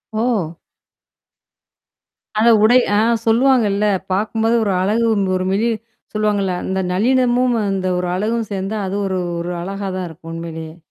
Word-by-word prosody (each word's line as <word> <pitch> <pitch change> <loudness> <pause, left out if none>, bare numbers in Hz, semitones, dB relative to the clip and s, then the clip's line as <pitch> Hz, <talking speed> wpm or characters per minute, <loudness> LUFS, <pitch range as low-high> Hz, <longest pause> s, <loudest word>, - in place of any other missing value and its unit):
ஓ! 210 -8 -1 1.8
அந்த 230 +2 +5
உடை 245 +3 +6 0.2
ஆ - - +4 0.3
சொல்லுவாங்கல்ல. 225 -4 +3 0.3
பாக்கும்போது 220 +3 +1
ஒரு 200 - 0
அழகு 220 +4 +1 0.3
ஒரு 185 - -2
மெழி 220 +4 +1 0.4
சொல்லுவாங்கல்ல. 205 -3 0
அந்த 190 0 -1
நல்லினமும் 250 +3 +2
அந்த 190 -1 -1
ஒரு 180 -1 -2
அழகும் 220 +3 -1
சேர்ந்தா 195 +2 -3
அது 195 +2 -3
ஒரு 185 -1 -1 0.2
ஒரு 175 +1 -3
அழகா 195 +2 -4
தான் 180 -1 -3
இருக்கும் 165 +1 -11
உண்மையிலேயே. 165 -1 -7
205 Hz, 130 wpm, -19 LUFS, 185-230 Hz, 1.8 s, உடை